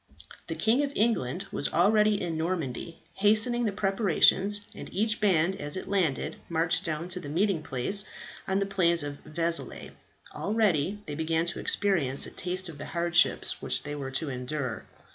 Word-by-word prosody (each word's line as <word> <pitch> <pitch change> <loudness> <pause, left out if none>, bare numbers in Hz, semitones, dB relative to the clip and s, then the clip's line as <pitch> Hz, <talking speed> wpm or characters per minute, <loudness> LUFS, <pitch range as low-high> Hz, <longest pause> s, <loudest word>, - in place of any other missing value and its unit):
The - - -3
King 230 +5 +2
of 280 - -2
England 195 - 0
was 140 - -1
already 210 +3 +3
in 170 -2 -3
Normandy 165 -2 -3
hastening 220 +5 +3
the 210 - +1
preparations, 195 0 +3
and - - -9
each 220 +3 0
band, 190 -2 +3
as 145 +4 -3
it - - -6
landed, 180 -9 0
marched 170 +2 +1
down 165 -1 -2
to 180 - 0
the 145 - -8
meeting 180 +2 +1
place 155 +9 -1 0.4
on 190 - +1
the 200 - +1
plains 170 -5 +2
of 145 -1 -6
Vezelay. 165 +1 -1 0.4
Already 205 -2 0
they 150 - -5
began 160 +2 0
to 175 - -1
experience 165 -10 +1
a - - -8
taste 185 +1 -2
of 155 -4 -9
the - - -6
hardships 170 -1 +1
which - - 0
they 145 - -5
were 140 -2 -5
to 140 +2 -2
endure. 125 -2 -4
175 Hz, 170 wpm, -28 LUFS, 155-200 Hz, 0.4 s, already